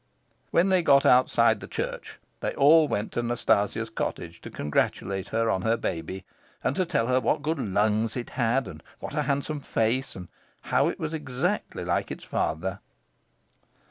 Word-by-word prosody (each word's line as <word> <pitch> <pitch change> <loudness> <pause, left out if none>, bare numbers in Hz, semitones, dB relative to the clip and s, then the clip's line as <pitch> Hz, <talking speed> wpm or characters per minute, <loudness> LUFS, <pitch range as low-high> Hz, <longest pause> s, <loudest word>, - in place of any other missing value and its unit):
When 180 +3 +3
they 185 -1 +4
got 140 -4 +5
outside 125 +1 +4
the - - -9
church, - - -5 0.2
they - - -3
all 155 +2 +6
went 105 -4 -2
to 120 - -1
Nastasia's 120 -4 0
cottage - - -4
to - - -8
congratulate 95 +6 -1
her 115 +1 0
on 95 - 0
her 115 +3 +1
baby, 95 +1 -4 0.4
and 140 - 0
to 185 - 0
tell 115 - +1
her 130 +1 +2
what 145 - 0
good 160 0 -1
lungs 110 +1 +1
it 120 - -5
had, 120 0 +1
and 80 -5 -9 0.2
what - - -7
a 150 - 0
handsome 140 +1 -1
face, 125 0 -1
and 90 -2 -8 0.3
how - - +2
it - - -3
was 160 0 -3
exactly 155 +6 -2
like - - 0
its - - -7
father. 95 +5 -2
120 Hz, 175 wpm, -26 LUFS, 100-145 Hz, 0.4 s, all